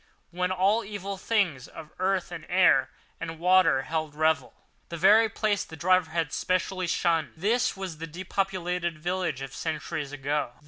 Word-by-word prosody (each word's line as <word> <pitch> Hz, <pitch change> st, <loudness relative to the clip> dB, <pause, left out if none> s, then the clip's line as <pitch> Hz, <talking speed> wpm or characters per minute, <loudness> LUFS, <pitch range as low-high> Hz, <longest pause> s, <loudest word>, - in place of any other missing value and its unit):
When 180 Hz, +1 st, -1 dB
all 195 Hz, +5 st, +2 dB
evil 200 Hz, -1 st, -5 dB
things 185 Hz, -, 0 dB
of 155 Hz, -, -11 dB
earth 190 Hz, 0 st, 0 dB
and -, -, -7 dB
air -, -, +4 dB, 0.3 s
and 165 Hz, 0 st, -5 dB
water 175 Hz, -5 st, +4 dB
held 155 Hz, -1 st, -3 dB
revel. 160 Hz, +1 st, +1 dB, 0.3 s
This 170 Hz, -, -6 dB
very 215 Hz, +5 st, +6 dB
place 205 Hz, -1 st, 0 dB
the 160 Hz, -, -11 dB
driver 185 Hz, +1 st, +3 dB
had 165 Hz, -1 st, -2 dB
specially 185 Hz, 0 st, -1 dB
shunned. 165 Hz, -2 st, +1 dB
This 215 Hz, +6 st, +1 dB
was 185 Hz, -5 st, -6 dB
the 165 Hz, -, -5 dB
depopulated 180 Hz, -1 st, -2 dB
village 175 Hz, -4 st, -2 dB
of 135 Hz, -1 st, -8 dB
centuries 155 Hz, -2 st, -4 dB
ago. 145 Hz, -2 st, -2 dB
175 Hz, 155 wpm, -27 LUFS, 160-190 Hz, 0.3 s, very